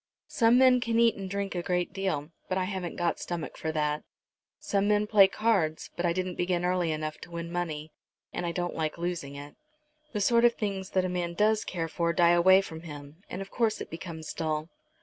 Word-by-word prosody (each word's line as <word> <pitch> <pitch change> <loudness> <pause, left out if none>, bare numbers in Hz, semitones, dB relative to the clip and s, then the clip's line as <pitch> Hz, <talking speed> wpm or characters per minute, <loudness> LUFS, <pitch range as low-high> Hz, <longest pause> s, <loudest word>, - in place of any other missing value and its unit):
Some 230 0 +4
men 255 -1 +6
can 230 -1 0
eat 230 -2 +5
and 195 -1 -6
drink 200 0 -2
a 175 - -2
great 180 +1 -1
deal, 180 -6 -2 0.2
but 185 - 0
I 185 - +1
haven't 185 -2 -4
got 175 -1 0
stomach 175 -2 -4
for 160 - -3
that. 150 -1 0 0.6
Some 200 0 0
men 210 0 +3
play 205 -2 +7
cards; 190 -8 0
but 175 - 0
I - - +2
didn't 185 0 -2
begin 175 0 +1
early 180 -2 +1
enough 155 0 -3
to - - -10
win 170 0 -5
money, 160 -3 -3 0.4
and 175 - -3
I 170 - -1
don't 175 0 -2
like 155 0 -2
losing 170 -5 -3
it. 145 +1 -9 0.6
The 210 - -2
sort 235 +3 +4
of 240 -1 +5
things 195 -3 -3
that 185 - +3
a - - +1
man 175 -1 -2
does 215 +3 +3
care 165 -3 -3
for 170 +1 0
die 170 +1 +5
away 185 +2 +6
from 160 -4 -8
him, 145 0 -10
and 195 - -4
of 195 - -15
course 225 -3 +1
it - - -7
becomes 165 -1 -6
dull." 155 0 -2
175 Hz, 220 wpm, -29 LUFS, 165-195 Hz, 0.6 s, play